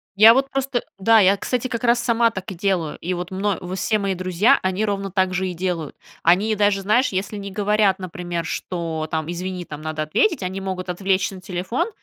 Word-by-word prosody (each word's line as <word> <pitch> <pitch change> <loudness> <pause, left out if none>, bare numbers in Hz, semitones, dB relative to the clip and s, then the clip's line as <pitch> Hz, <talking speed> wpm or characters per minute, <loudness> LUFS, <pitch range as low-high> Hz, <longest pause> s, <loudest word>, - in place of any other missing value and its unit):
я 220 +3 +9
вот 270 +2 +1
просто, 270 -2 -1 0.2
да, 225 +3 +5
я, 195 0 +5
кстати, 250 +4 -2
как 235 -1 -4
раз 235 0 +4
сама 235 -1 +3
так 195 -2 -6
и - - -7
делаю, 175 -4 -1
и 180 +2 -2
вот 180 0 -5
мно 195 0 -1 0.2
все 215 +3 +1
мои 195 -1 -1
друзья, 185 +8 +3
они 190 +2 0
ровно 200 -2 -2
так 185 0 +1
же 190 +1 -1
и 180 - -4
делают. 170 -4 -3 0.3
Они 200 +6 +3
даже, 205 -1 +2
знаешь, 225 +7 +3
если 195 +2 -3
не 200 0 -6
говорят, 205 -1 +2
например, 175 -2 -4
что, 160 -2 -3
там: 160 +1 -2
"Извини, 180 +1 -4
там 150 -1 -8
надо 155 0 -3
ответить",- 275 - +1
они 185 +1 -3
могут 185 -1 -4
отвлечься 190 +1 0
на 185 - -11
телефон, 185 - -2
190 Hz, 210 wpm, -22 LUFS, 180-210 Hz, 0.3 s, я